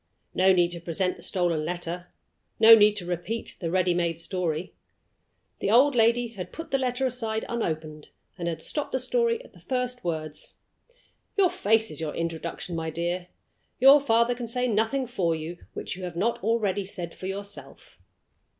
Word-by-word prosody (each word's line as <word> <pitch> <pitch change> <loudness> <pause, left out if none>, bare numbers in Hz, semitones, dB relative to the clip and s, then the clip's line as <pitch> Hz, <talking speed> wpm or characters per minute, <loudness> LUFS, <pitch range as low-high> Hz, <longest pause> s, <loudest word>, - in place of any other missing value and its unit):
No 190 +1 +5
need 175 -2 +3
to 175 - -3
present 175 +2 -1
the - - -14
stolen 175 -5 0
letter; 175 +1 -4 0.5
no 225 +1 +10
need 210 -1 +7
to 190 -4 -4
repeat 180 +6 -4
the 170 - -1
ready 180 0 +2
made 170 -2 0
story. 170 -1 -2 0.9
The - - -1
old 260 +6 +6
lady 235 0 +3
had 195 -6 -8
put 325 - -8
the 270 - +2
letter 255 0 0
aside 225 -3 -2
unopened, 155 -9 -4 0.3
and 175 -2 -4
had 160 -1 -3
stopped 295 - -3
the 260 - +1
story 470 - +1
at - - -17
the - - -17
first 250 -1 -3
words. 155 -3 -4 0.8
"Your 380 -3 +4
face 220 +1 +2
is 155 - -4
your 155 -2 -3
introduction, 165 +1 -4
my 160 0 -2
dear; 175 +2 -3 0.5
your 270 +3 +8
father 235 -3 +3
can 240 -1 -6
say 250 +2 0
nothing 225 +4 +1
for 185 -9 0
you 160 +2 -6
which - - -5
you 185 - -9
have 175 -2 -6
not 205 +3 0
already 210 -3 +1
said 175 -3 -6
for 185 - -7
yourself." 200 +1 -7
190 Hz, 175 wpm, -26 LUFS, 170-235 Hz, 0.9 s, no